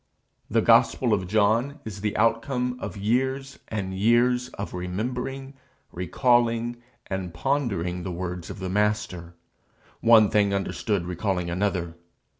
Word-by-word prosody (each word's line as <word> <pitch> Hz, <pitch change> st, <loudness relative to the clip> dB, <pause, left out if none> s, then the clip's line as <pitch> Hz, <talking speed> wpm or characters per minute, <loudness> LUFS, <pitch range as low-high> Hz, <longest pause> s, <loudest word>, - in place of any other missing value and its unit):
The -, -, +2 dB
gospel 120 Hz, -4 st, +4 dB
of 95 Hz, -3 st, 0 dB
John 110 Hz, +8 st, +2 dB
is 100 Hz, -3 st, -7 dB
the 105 Hz, -1 st, -1 dB
outcome 125 Hz, +3 st, +1 dB
of 100 Hz, -2 st, -5 dB
years 130 Hz, +6 st, -1 dB
and 100 Hz, -3 st, -3 dB
years 120 Hz, +5 st, +2 dB
of 100 Hz, -, -6 dB
remembering, 125 Hz, +9 st, -4 dB, 0.4 s
recalling, 120 Hz, -, +1 dB, 0.3 s
and 95 Hz, -2 st, -4 dB
pondering 100 Hz, -, -1 dB
the 90 Hz, -, -4 dB
words 90 Hz, 0 st, -5 dB
of -, -, -7 dB
the 95 Hz, -, -4 dB
Master, 100 Hz, -4 st, -1 dB, 0.6 s
one 110 Hz, -3 st, +6 dB
thing 100 Hz, -1 st, +3 dB
understood 100 Hz, -1 st, -1 dB
recalling 90 Hz, 0 st, -2 dB
another. 90 Hz, -2 st, -1 dB
105 Hz, 125 wpm, -25 LUFS, 90-120 Hz, 0.6 s, one